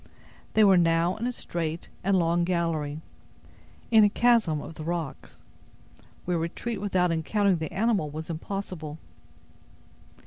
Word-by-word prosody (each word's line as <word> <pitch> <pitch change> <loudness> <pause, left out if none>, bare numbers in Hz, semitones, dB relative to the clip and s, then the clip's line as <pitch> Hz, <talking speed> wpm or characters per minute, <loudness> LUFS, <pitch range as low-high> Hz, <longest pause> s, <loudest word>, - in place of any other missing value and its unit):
They 220 - +6
were 195 -3 +6
now 165 +1 +2
in 235 +3 -2
a - - 0
straight 165 -7 -4 0.2
and 195 +1 +3
long 170 0 +2
gallery, 165 -4 -1 0.9
in 220 -2 +7
a 205 - +6
chasm 220 -9 +3
of 165 - -8
the 155 - -8
rocks, 165 -3 -5 0.8
where 175 -1 0
retreat 190 +6 -4
without 185 -3 +1
encountering 190 +4 +1
the 160 -2 -4
animal 205 -6 +1
was 155 +2 -6
impossible. 165 -2 -5
175 Hz, 135 wpm, -27 LUFS, 160-200 Hz, 0.9 s, in